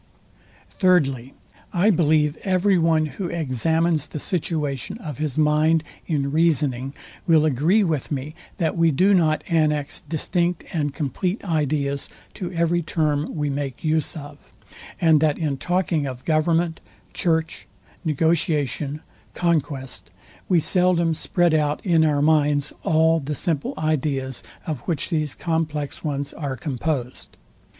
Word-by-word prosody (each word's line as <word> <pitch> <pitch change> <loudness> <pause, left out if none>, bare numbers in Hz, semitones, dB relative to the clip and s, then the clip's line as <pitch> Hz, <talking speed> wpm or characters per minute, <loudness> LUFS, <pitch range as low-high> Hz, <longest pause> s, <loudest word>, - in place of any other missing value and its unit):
Thirdly, 135 -9 +1 0.4
I 190 +5 +3
believe 155 -3 +2
every 190 0 +2
one, 160 -1 +3
who 155 +6 -5
examines 160 +1 0
the - - -7
situation 150 - -2
of 150 - -7
his 155 -3 -2
mind 155 +1 +3 0.2
in 140 -4 0
reasoning 145 -4 +1 0.3
will 160 -2 +5
agree 155 - +3
with 160 -7 -2
me, 145 +2 -3 0.2
that 165 -5 0
we 165 -1 +4
do 185 +7 +3
not 160 -4 +2
annex 150 -3 0
distinct 170 +3 -1
and 145 -4 0
compleat 175 - -2
ideas 145 -4 -1 0.2
to 180 - -5
every 170 0 +1
term 155 -1 -1
we 150 -2 -1
make 140 -2 -4
use 160 0 0
of, 145 -1 -11 0.5
and 160 -4 +4
that 155 -2 +2
in 150 -4 -1
talking 175 -1 0
of 130 -1 -7
government, 165 +1 +1 0.3
church, 160 -2 -1 0.4
negotiation, 150 -3 0 0.3
conquest, 150 -6 -1 0.4
we 180 -3 +5
seldom 175 0 +2
spread 175 +1 +1
out 150 -1 +1
in 165 -4 +4
our 145 -2 +2
minds 150 -2 +2
all 160 +1 +3
the 150 0 -4
simple 155 -1 -1
ideas, 140 -4 -1 0.2
of 155 -5 -3
which 165 +1 -1
these 155 -4 -1
complex 155 -4 -2
ones 140 -2 -3
are 140 -4 -4
composed. 135 -4 -4
155 Hz, 130 wpm, -23 LUFS, 145-170 Hz, 0.5 s, will